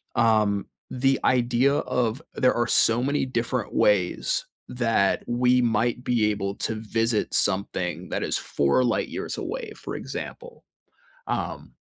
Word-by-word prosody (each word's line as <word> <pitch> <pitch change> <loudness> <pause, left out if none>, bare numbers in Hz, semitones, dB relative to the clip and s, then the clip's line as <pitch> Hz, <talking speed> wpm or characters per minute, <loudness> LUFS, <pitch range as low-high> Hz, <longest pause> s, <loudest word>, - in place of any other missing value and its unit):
um, 110 -3 +2 0.3
the 135 +1 +2
idea 125 +2 +3
of 125 0 -1
there 130 - +3
are 120 0 +1
so 115 +3 +3
many 140 0 0
different 120 -2 -2
ways 95 -4 +2 0.2
that 115 -5 +1
we 125 +1 +3
might 120 +1 0
be 110 -3 +2
able 100 -1 -3
to 110 - -3
visit 115 +1 -1
something 90 -3 -1
that - - -2
is - - 0
4 70 - +1
light 120 -2 0
years - - -5
away, 470 -4 -5
for - - -7
example. 485 0 -7 0.7
Um, - - -4
120 Hz, 135 wpm, -25 LUFS, 105-125 Hz, 0.7 s, idea